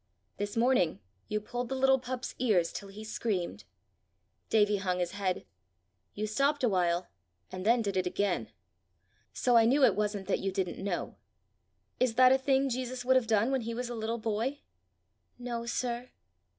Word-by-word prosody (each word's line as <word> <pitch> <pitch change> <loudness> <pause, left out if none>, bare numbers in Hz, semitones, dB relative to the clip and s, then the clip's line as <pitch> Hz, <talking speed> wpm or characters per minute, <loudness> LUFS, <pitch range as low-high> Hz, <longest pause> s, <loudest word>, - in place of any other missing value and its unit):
This 205 +2 -3
morning 230 -9 +3 0.3
you 210 - -1
pulled 245 +3 -5
the 265 - -2
little 265 0 +4
pup's 255 0 -5
ears 195 -9 +2
till 200 - -6
he 210 +2 -9
screamed." 215 -4 -3 0.8
Davie 210 -1 +3
hung 185 -2 -1
his 175 -1 -1
head. 195 -2 -2 0.7
"You 210 - -2
stopped 275 +7 +1
a - - +5
while, 175 -2 +1 0.4
and 185 +2 -4
then 235 0 +4
did 200 -2 -2
it 185 -1 +1
again! 195 0 -1 0.8
So 245 -1 +1
I 225 - +6
knew 270 +5 +4
it - - +3
wasn't 205 -2 -2
that 200 - +1
you 195 - -2
didn't 190 -1 -3
know. 190 -3 -3 0.8
Is 250 -3 +2
that 255 +1 +7
a 265 - +4
thing 270 0 +2
Jesus 255 -1 -3
would 260 +1 +4
have 255 -3 +3
done 225 +3 +2
when 265 -2 +1
he 230 0 -4
was 245 0 -3
a - - -4
little 225 +1 -2
boy?" 230 +5 -2 0.8
"No, 240 -1 -4
sir." 245 0 -2
225 Hz, 175 wpm, -30 LUFS, 200-250 Hz, 0.8 s, that